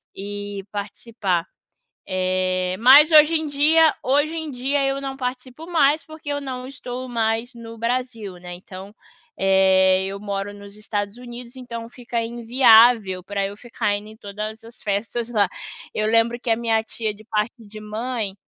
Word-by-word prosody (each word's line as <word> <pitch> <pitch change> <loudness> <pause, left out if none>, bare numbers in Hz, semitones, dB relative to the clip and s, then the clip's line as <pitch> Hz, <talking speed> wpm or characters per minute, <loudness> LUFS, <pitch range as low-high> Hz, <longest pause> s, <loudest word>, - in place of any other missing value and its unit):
e 205 0 -6
participar. 205 -3 -3 0.6
Eh, 185 0 0
mas 285 +7 +8
hoje 310 +1 +7
em 315 -1 0
dia 310 +3 +4
hoje 290 +4 +2
em 315 -2 -4
dia 270 +2 0
eu 270 0 -1
não 270 -1 -5
participo 255 +4 -5
mais 310 -3 +3
porque 315 -2 -10
eu 285 - -1
não 255 -2 -6
estou 255 -1 -7
mais 230 +1 -1
no 230 -1 -10
Brasil, 230 -4 -3
né, 180 0 -9
então, 190 +3 -11 0.4
eh, 190 0 +4
eu 195 +1 -4
moro 200 0 -4
nos 200 0 -12
Estados 205 0 -4
Unidos, 245 +1 -9
então, 235 -2 -7
fica 235 -1 -4
inviável 230 -4 +5
pra 200 0 -2
eu 200 +1 -6
ficar 230 -3 -2
indo 210 +1 -10
em 220 - -13
todas 215 +1 -7
as 230 +1 -13
festas 220 +3 -2
lá. 205 -5 +2 0.4
Eu 215 0 0
lembro 230 +1 +2
que 240 - -5
a 225 - +4
minha 225 -1 +1
tia 220 -1 -3
de 215 +1 -17
parte 220 +1 -2
de 215 +1 -10
mãe, 215 -1 -3
230 Hz, 165 wpm, -22 LUFS, 205-255 Hz, 0.6 s, mas